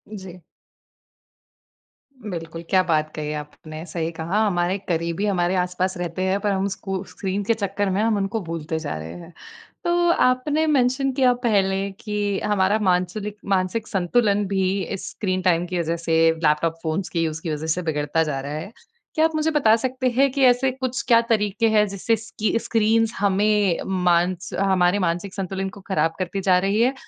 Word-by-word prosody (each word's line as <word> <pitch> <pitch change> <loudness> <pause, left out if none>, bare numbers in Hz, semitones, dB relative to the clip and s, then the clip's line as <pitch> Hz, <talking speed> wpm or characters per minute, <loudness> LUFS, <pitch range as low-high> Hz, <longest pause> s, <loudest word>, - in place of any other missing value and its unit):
जी। 185 -2 -9 1.9
बिल्कुल, 165 -1 -6
क्या 185 -1 +5
बात 155 -3 0
कही 150 -1 -3
आपने 155 +2 -9
सही 165 0 -3
कहा 170 +5 -2
हमारे 180 0 +1
करीबी 170 +3 -1
हमारे 185 -2 +1
आस-पास 180 +1 -1
रहते 175 +1 -4
हैं 190 +1 +1
पर 205 - +1
हम 195 0 0
स्कू 195 -1 -4
स्क्रीन 195 +1 -3
के 230 +3 +2
चक्कर 200 -2 -2
में 195 +3 0
हम 220 -2 +2
उनको 200 +3 -1
भूलते 160 -1 -4
जा 150 - -4
रहे 80 +1 -7
हैं। 170 0 -12 0.5
तो 345 0 +2
आपने 290 +4 +2
मेंशन 270 -1 +2
किया 250 -1 +5
पहले 195 -3 +1
कि 205 -2 -2
हमारा 205 +1 +2
मानसुलिक 185 +4 0 0.2
मानसिक 190 +4 0
संतुलन 200 +2 +1
भी 190 -1 0
स्क्रीन 185 -3 -3
टाइम 175 -1 +2
की 180 -1 -2
वज़ह 165 0 -1
से 165 -1 0 0.3
लैपटॉप, 150 +2 +2
फ़ोन्स 165 +4 -2
की 165 -1 0
यूज़ 160 0 -3
की 165 - -4
वजह 155 +2 -4
से 180 - -3
बिगड़ता 155 0 0
जा 145 -3 -2
रहा 140 +2 -5
है। 165 +8 -5 0.4
क्या 315 0 +4
आप 325 - +1
मुझे 310 +1 +1
बता 225 -8 +4
सकते 255 +2 -1
हैं 275 0 +5
कि 275 0 0
ऐसे 255 +1 +4
कुछ 260 0 -3
क्या 230 -2 +6
तरीके 215 +1 +2
हैं, 210 -1 +3
जिससे 200 +4 0
स्की 220 0 -2
स्क्रीन्स 225 0 +2
हमें 205 -2 +2 0.3
मांस 175 +1 +1
हमारे 190 0 +3
मानसिक 175 +3 -2
संतुलन 190 0 -3
को - - -11
खराब 165 -4 +1
करती 185 +2 -2
जा 185 -1 +4
रही 210 +3 +2
है, 255 +3 +3
190 Hz, 175 wpm, -23 LUFS, 170-215 Hz, 1.9 s, क्या